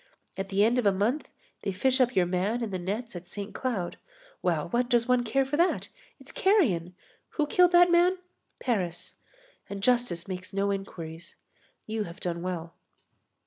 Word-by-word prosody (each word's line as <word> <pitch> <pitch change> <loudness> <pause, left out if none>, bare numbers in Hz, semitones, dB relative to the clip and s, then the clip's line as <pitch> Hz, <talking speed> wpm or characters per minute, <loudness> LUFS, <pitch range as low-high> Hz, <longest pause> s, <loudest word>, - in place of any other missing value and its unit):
At 195 0 -4
the 195 +1 +3
end 240 +3 +3
of 225 - +2
a - - +6
month 215 +10 0 0.3
they 200 - -2
fish 260 +7 +2
up 250 0 +2
your 185 - +4
man 190 +7 0
in 220 - -3
the 185 - -2
nets 210 +5 -4
at 175 0 -7
Saint 205 0 -7
Cloud. 225 -10 -3 0.4
Well, 160 -4 0
what 240 +4 +1
does 240 -1 +3
one 250 -1 +3
care 265 +4 +1
for 280 +2 -2
that? 345 +3 +2 0.3
It's - - -10
carrion! 200 - +2 0.4
Who 305 - +3
killed 355 +4 +4
that 350 0 +7
man? 350 +2 +4 0.4
Paris. 185 -9 -2 0.5
And 200 -1 -6
justice 240 -8 +2
makes 185 0 -6
no 200 +1 +1
inquiries. 170 -4 -6 0.5
You 220 -1 -2
have 170 +3 -10
done 170 -3 -2
well." 170 -2 -4
205 Hz, 180 wpm, -28 LUFS, 180-250 Hz, 0.5 s, that